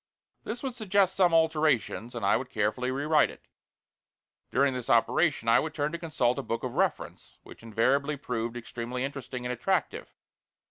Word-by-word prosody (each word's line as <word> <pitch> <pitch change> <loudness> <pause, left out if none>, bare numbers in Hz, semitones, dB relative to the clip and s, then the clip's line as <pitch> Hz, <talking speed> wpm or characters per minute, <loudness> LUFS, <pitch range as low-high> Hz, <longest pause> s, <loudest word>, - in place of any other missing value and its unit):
This 235 +4 -5
would 265 -2 -3
suggest 200 -4 +1
some 180 -3 +4
alterations, 155 -7 +1
and 115 -4 -3
I - - +4
would 125 +1 -3
carefully 110 +4 -1
rewrite 145 +3 +2
it. - - -13 1.1
During 140 0 +2
this 125 0 -5
operation 125 +2 +2
I 115 - +6
would 155 0 -4
turn 150 0 -1
to 170 - -5
consult 125 -7 0
a - - -1
book 115 +1 -4
of 125 -2 -3
reference, - - -2
which - - -14
invariably 130 +6 +1
proved 120 -3 -3
extremely 120 +2 -5
interesting 130 -2 -5
and 125 - -1
attractive. 175 +9 -1
130 Hz, 170 wpm, -28 LUFS, 120-160 Hz, 1.1 s, I